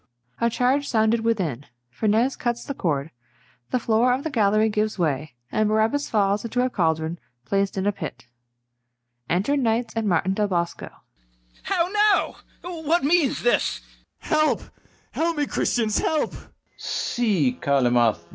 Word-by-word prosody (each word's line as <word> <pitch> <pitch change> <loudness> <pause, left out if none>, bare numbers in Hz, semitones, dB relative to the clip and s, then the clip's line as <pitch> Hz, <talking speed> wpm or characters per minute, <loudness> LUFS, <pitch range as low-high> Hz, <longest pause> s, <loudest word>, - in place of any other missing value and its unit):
[A 235 - +2
charge 260 +5 +1
sounded 220 0 +2
within: 185 - -1 0.2
FERNEZE 220 - +1
cuts 240 -1 -2
the 280 - -4
cord; 155 - -2 0.6
the - - +1
floor 235 +1 +2
of 260 +2 -2
the 320 - -3
gallery 215 -2 +3
gives 215 0 -1
way, 150 -5 -1 0.2
and 215 -1 +1
BARABAS 220 +7 +1
falls 200 -1 +1
into 245 +2 0
a 255 - -2
caldron 160 -3 0 0.3
placed 195 0 0
in 190 - -1
a 205 - +3
pit. 195 - -7 1.0
Enter 195 +12 +1
KNIGHTS 235 -3 0
and 225 -1 -1
MARTIN 180 +2 +1
DEL 210 +1 0
BOSCO. 170 -3 -2
CALYMATH. - - -25
How 355 -3 +1
now! 420 0 +2 0.5
what 320 +2 +1
means 305 -2 +2
this? 240 - +1
BARABAS. - - -19
Help, 310 0 +3 0.5
help 330 0 -1
me, 295 - +1
Christians, 225 -6 0
help! 310 -2 0
FERNEZE. - - -12 0.3
See, 195 - 0
Calymath! 120 -9 +2
220 Hz, 150 wpm, -24 LUFS, 170-255 Hz, 1.0 s, gallery